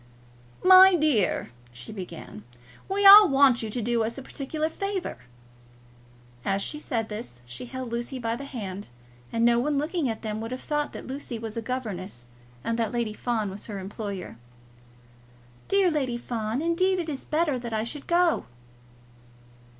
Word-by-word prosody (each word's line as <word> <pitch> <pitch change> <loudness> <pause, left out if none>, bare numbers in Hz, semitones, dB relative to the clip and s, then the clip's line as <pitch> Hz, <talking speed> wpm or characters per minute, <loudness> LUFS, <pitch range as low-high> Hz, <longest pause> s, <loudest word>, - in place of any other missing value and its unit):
"My 375 0 +9
dear," 290 - +1 0.2
she 125 - -9
began, 175 - -8 0.5
"we 400 +1 0
all 400 -1 +11
want 270 -3 +5
you 220 - -4
to 240 +3 -3
do 235 0 +1
us 230 +3 -4
a 270 - -7
particular 305 +4 -3
favour." 390 - -4 1.2
As 195 0 0
she 300 - -4
said 230 -7 -2
this, 210 - -7
she 120 - -7
held 255 -1 -6
Lucy 240 +3 -3
by 230 -2 -2
the 275 +3 -7
hand, 205 -7 -6 0.4
and 230 0 +1
no 235 0 +4
one 290 +3 0
looking 300 -1 -1
at 225 0 -5
them 215 0 -3
would 225 - -5
have 255 +1 -6
thought 295 -1 -1
that - - -8
Lucy 265 -2 -5
was 220 -1 -6
a 230 - -2
governess 205 - -5 0.4
and 230 0 -1
that 225 -2 0
Lady 235 -3 -2
Fawn 220 -3 -2
was 200 +2 -9
her 210 -3 -5
employer. 195 - -6 1.3
"Dear 390 -3 +3
Lady 265 -6 -1
Fawn, 235 +2 -3
indeed 370 +3 +2
it 345 -2 -3
is 280 -4 -4
better 305 -4 0
that 235 -1 -6
I 220 0 -1
should 275 +5 -6
go." 345 0 +2
240 Hz, 170 wpm, -26 LUFS, 215-300 Hz, 1.3 s, all